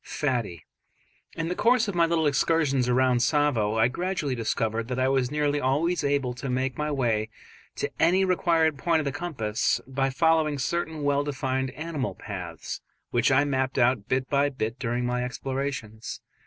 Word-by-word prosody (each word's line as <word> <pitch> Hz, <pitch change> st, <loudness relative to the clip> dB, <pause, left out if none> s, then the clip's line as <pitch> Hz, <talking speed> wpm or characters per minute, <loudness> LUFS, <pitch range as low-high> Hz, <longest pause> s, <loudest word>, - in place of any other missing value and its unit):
"Fattie"). 120 Hz, -, -2 dB, 0.7 s
In 165 Hz, 0 st, -2 dB
the 175 Hz, -, -1 dB
course 230 Hz, +3 st, +3 dB
of 200 Hz, -, -2 dB
my 170 Hz, -1 st, +3 dB
little 165 Hz, -1 st, +1 dB
excursions 140 Hz, -3 st, +2 dB
round 125 Hz, 0 st, +3 dB
Tsavo 125 Hz, -6 st, +2 dB
I 110 Hz, +1 st, +5 dB
gradually 175 Hz, 0 st, -2 dB
discovered 115 Hz, -1 st, -1 dB
that 125 Hz, 0 st, -3 dB
I 130 Hz, 0 st, +2 dB
was 130 Hz, -2 st, +1 dB
nearly 145 Hz, 0 st, 0 dB
always 150 Hz, +7 st, +1 dB
able 140 Hz, -3 st, 0 dB
to 125 Hz, +2 st, -6 dB
make 130 Hz, 0 st, -1 dB
my 150 Hz, +2 st, -2 dB
way 115 Hz, -6 st, 0 dB, 0.5 s
to -, -, -3 dB
any 185 Hz, +3 st, +4 dB
required 165 Hz, -5 st, +2 dB
point 165 Hz, 0 st, +2 dB
of -, -, -5 dB
the 140 Hz, -, 0 dB
compass 130 Hz, -10 st, -1 dB
by 135 Hz, +1 st, -1 dB
following 155 Hz, +1 st, +2 dB
certain 160 Hz, +2 st, -2 dB
well 145 Hz, 0 st, +2 dB
defined 135 Hz, -2 st, -2 dB
animal 155 Hz, -4 st, -3 dB
paths, 90 Hz, -6 st, -6 dB, 0.3 s
which 120 Hz, +3 st, +2 dB
I 135 Hz, +2 st, +5 dB
mapped 130 Hz, -2 st, -1 dB
out 120 Hz, -4 st, +2 dB
bit 130 Hz, 0 st, 0 dB
by 140 Hz, 0 st, +2 dB
bit 120 Hz, -3 st, -4 dB
during 120 Hz, -1 st, -1 dB
my 125 Hz, 0 st, 0 dB
explorations. 125 Hz, -3 st, -4 dB
135 Hz, 170 wpm, -26 LUFS, 125-150 Hz, 0.7 s, I